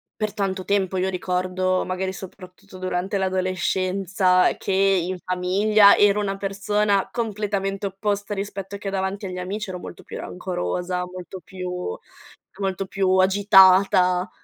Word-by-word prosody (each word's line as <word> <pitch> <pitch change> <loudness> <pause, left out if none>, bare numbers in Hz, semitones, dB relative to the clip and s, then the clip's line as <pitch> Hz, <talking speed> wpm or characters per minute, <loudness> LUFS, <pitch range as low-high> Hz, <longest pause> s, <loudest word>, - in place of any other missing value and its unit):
per 215 -1 -3
tanto 190 -3 -2
tempo, 195 -2 0
io 185 +1 0
ricordo, 185 0 -1
magari, 185 +1 -3
soprattutto 185 0 -12
durante 185 +1 -2
l'adolescenza, 185 0 +1
che, - - -4
in 190 -2 +2
famiglia, 200 +4 +4
ero 205 0 +4
una 195 -1 -2
persona 200 +1 0
completamente 205 -3 -2
opposta 205 +1 -3
rispetto 200 0 -5
che 200 0 -5
davanti 195 +1 -3
agli 180 0 -6
amici: 200 +3 -4
ero 180 - -6
molto 175 - -10
più - - -8
rancorosa, 180 - -3
molto 185 +1 -8
più 180 - -5 0.6
molto 195 -1 -2
più 195 0 -1
agitata. 190 -1 +5
190 Hz, 130 wpm, -23 LUFS, 185-200 Hz, 0.6 s, agitata